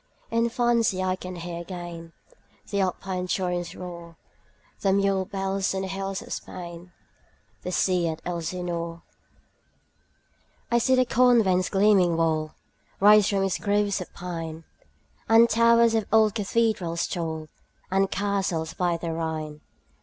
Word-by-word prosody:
In 230 +1 +2
fancy 230 -5 +1
I 185 0 +1
can 185 -1 -8
hear 170 0 -6
again 170 -2 -8 0.6
The 200 - 0
Alpine 185 0 -2
torrent's 180 -2 -2
roar, 170 -2 -9 0.6
The 195 -1 +2
mule 195 -1 +2
bells 195 -1 -2
on 190 - -2
the - - -3
hills 195 0 -4
of - - -6
Spain, 175 0 -8 0.7
15 - - -41
The 180 - -4
sea 180 -1 +1
at 160 -1 -4
Elsinore. 170 -1 -4 1.7
I 235 - +4
see 260 +2 +3
the 255 0 +3
convent's 225 -8 +3
gleaming 195 -4 +4
wall 155 -2 0 0.4
Rise 210 0 +6
from 195 -1 +1
its 195 -2 -1
groves 205 -1 +1
of 180 - -8
pine, 165 -2 -6 0.7
And 225 +1 +7
towers 230 0 +4
of 220 -2 0
old 220 -2 +5
cathedrals 205 -5 0
tall, 160 -3 -4 0.4
And 195 0 +2
castles 195 -5 -1
by 175 -2 0
the 165 0 -4
Rhine. 155 -2 -4
185 Hz, 140 wpm, -25 LUFS, 170-205 Hz, 1.7 s, And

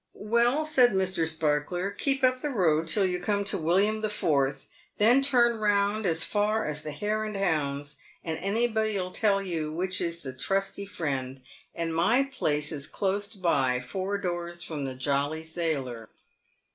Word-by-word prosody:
"Well," 235 +7 +1
said 255 -7 +4
Mr. 185 -3 +1
Sparkler; 160 +4 -1
"keep 270 +5 0
up 255 0 +3
the 295 - -2
road 165 - +2
till 195 +4 +3
you 180 -1 -1
come 200 +2 0
to 200 - -1
the - - -6
William 200 +7 +2
the 215 - -1
Fourth, 140 -8 0 0.3
then 240 +6 +5
turn 240 -4 +3
round 205 0 +1
as 165 -1 +1
far 215 +1 0
as 150 0 -3
the 155 - -5
Hare 210 +8 -2
and 215 -1 -4
Hounds, 145 -6 -1 0.3
and 160 -1 -2
anybody 220 +2 0
'11 185 -2 -3
tell 200 -3 +2
you 160 -5 -3
which 185 +4 -1
is 170 0 -2
the 130 -2 -6
Trusty 195 +8 -2
Friend, 135 -8 -3 0.4
and 165 -1 -2
my 230 +11 +3
place 150 - -1
is 145 -2 -2
close 200 +4 -1
by, 135 -9 +1
four 190 +10 -3
doors 175 -2 -4
from 150 -4 -4
the 130 -1 -4
Jolly 140 +4 -1
Sailor." 140 -9 -3
180 Hz, 170 wpm, -27 LUFS, 155-210 Hz, 0.4 s, then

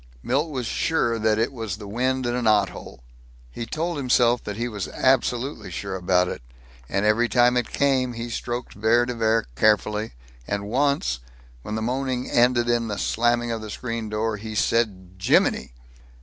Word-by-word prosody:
Milt 140 +6 0
was 130 -5 -3
sure 115 -3 0
that 110 0 +2
it 115 +4 0
was 110 -6 -4
the 105 -2 -9
wind 130 +4 0
in 120 - 0
a 125 - -1
knothole. 100 - 0 0.5
He 115 - -6
told 165 +4 -2
himself 125 -3 +3
that 105 - -4
he 120 +1 -1
was 105 -5 -4
absolutely 130 -3 0
sure 95 +3 -5
about 90 0 +2
it. 65 - -5 0.5
And 100 +1 0
every 115 +3 +3
time 120 0 +4
it 125 -2 0
came 130 -3 +1
he 115 +1 -5
stroked 120 +1 -4
Vere 110 +4 +3
de 125 - -3
Vere 115 -1 +1
carefully, 105 - +2 0.3
and 100 0 -2
once, 130 - +1 0.4
when 105 - -5
the 110 - -2
moaning 130 +1 -1
ended 120 0 +3
in 120 -1 +1
the 105 -2 -3
slamming 120 +2 +1
of 115 -1 -3
the 110 - -7
screen 115 -1 -4
door, 110 0 -1
he 110 +1 -7
said, 95 -6 0
"Jiminy!" 95 - +2
115 Hz, 180 wpm, -24 LUFS, 105-125 Hz, 0.5 s, time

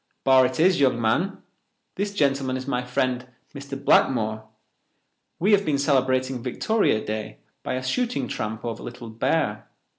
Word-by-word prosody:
"Barr 130 -1 +6
it 130 +2 -6
is, 180 +1 +4
young 130 -4 +3
man. 130 - 0 0.5
This 200 +1 -2
gentleman 135 -7 0
is 130 - -6
my 125 -3 -1
friend, 125 0 -1 0.3
Mr. 140 -1 -7
Blackmore. 110 -3 +2 0.9
We 195 +5 +2
have 200 -1 +5
been 150 -6 0
celebrating 130 -2 +1
Victoria 130 - 0
Day 110 0 -4 0.2
by - - -3
a 130 - -3
shooting 235 - -1
tramp 110 +1 -4
over 115 -1 -4
Little 120 -1 -8
Bear. 115 -2 -1
130 Hz, 150 wpm, -24 LUFS, 120-140 Hz, 0.9 s, Barr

